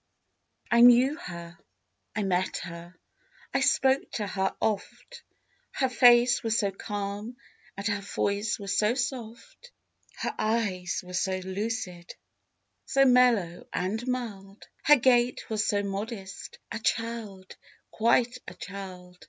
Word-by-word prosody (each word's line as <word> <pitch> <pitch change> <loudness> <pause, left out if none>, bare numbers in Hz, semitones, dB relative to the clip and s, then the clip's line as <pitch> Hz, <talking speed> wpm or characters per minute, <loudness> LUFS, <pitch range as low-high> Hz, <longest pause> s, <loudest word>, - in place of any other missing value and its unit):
P.) 235 - +1
I - - +6
knew 245 +4 +7
her, 170 - -9 0.6
I 215 - 0
met 185 -1 0
her, 170 0 -9 0.6
I 275 - +2
spoke 270 0 +2
to 210 - -2
her 190 -1 -1
oft, 220 - -3 0.5
Her 265 - +1
face 245 0 +5
was 225 0 0
so 200 -2 +1
calm 205 +3 -5 0.4
and 200 - -6
her 205 -2 0
voice 200 +1 -1
was 200 -1 -3
so 215 +3 +2
soft, 265 - -5 0.5
Her - - -3
eyes 205 -6 -1
were 180 - -10
so 190 +1 0
lucid, 190 -2 -4 0.7
so 275 0 +4
mellow 245 -9 +3
and 220 +7 -2
mild, 210 -6 -5 0.2
Her 295 - +8
gait 245 -2 +2
was 215 -1 0
so 205 -1 +1
modest—a 200 +2 -6
child, 225 -5 -3 0.4
quite 235 +2 +2
a - - -8
child! 185 -2 -9
215 Hz, 130 wpm, -28 LUFS, 195-240 Hz, 0.7 s, Her